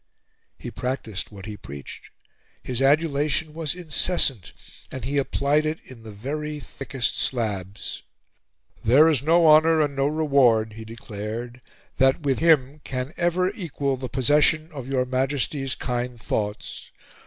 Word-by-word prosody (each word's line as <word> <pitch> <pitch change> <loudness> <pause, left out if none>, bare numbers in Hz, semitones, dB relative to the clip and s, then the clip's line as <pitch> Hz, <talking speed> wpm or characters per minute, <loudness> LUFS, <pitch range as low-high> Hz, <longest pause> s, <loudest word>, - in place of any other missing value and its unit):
He - - -7
practiced 115 -4 -4
what 100 -2 -10
he 105 -1 -6
preached. 70 -6 -10 0.5
His 125 0 -2
adulation 150 +1 +2
was 160 0 -2
incessant, 160 - +2 0.4
and 130 -2 -6
he 140 +2 0
applied 140 +2 +1
it 155 +1 -2
in 125 -3 -13
the 110 - -11
very 150 +8 -5
thickest 135 -4 -3
slabs. 105 -5 -2 0.8
"There 140 +8 +6
is 150 -6 +3
no 165 +3 +4
honor 160 +1 +6
and 145 -2 +1
no 135 0 +1
reward," 135 -8 +3
he 110 +1 -9
declared, 115 +2 -7 0.4
"that 135 +3 +3
with 140 -3 0
him 150 -3 +3
can 130 +3 -4
ever 180 +2 +1
equal 145 -8 -2
the 130 -1 -6
possession 150 +4 +2
of 135 -5 -7
your 130 -2 0
Majesty's 135 +1 -1
kind 125 -1 -3
thoughts. 105 -1 -4
135 Hz, 140 wpm, -24 LUFS, 120-150 Hz, 0.8 s, There